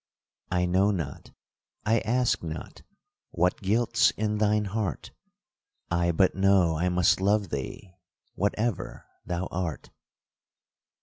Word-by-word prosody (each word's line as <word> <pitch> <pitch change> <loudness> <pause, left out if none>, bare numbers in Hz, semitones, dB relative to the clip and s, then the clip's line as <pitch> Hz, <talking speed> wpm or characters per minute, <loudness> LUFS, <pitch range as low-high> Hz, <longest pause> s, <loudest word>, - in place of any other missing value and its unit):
I 90 -1 +1
know 95 +3 +3
not, 80 -9 -4 0.6
I 115 +1 +3
ask 125 +2 +1
not, 80 -1 -7 0.5
what 90 +2 0
guilt's 110 +5 +3
in 105 0 -1
thine 105 0 +2
heart, 100 -1 -3 0.8
I 85 0 +2
but 90 +3 +3
know 95 -4 +3
I 90 +4 0
must 90 +1 +3
love 100 -1 +2
thee, 70 +6 -6 0.4
whatever 105 +2 -2 0.2
thou 90 +1 -2
art. 90 -3 -4
95 Hz, 115 wpm, -27 LUFS, 85-105 Hz, 0.8 s, know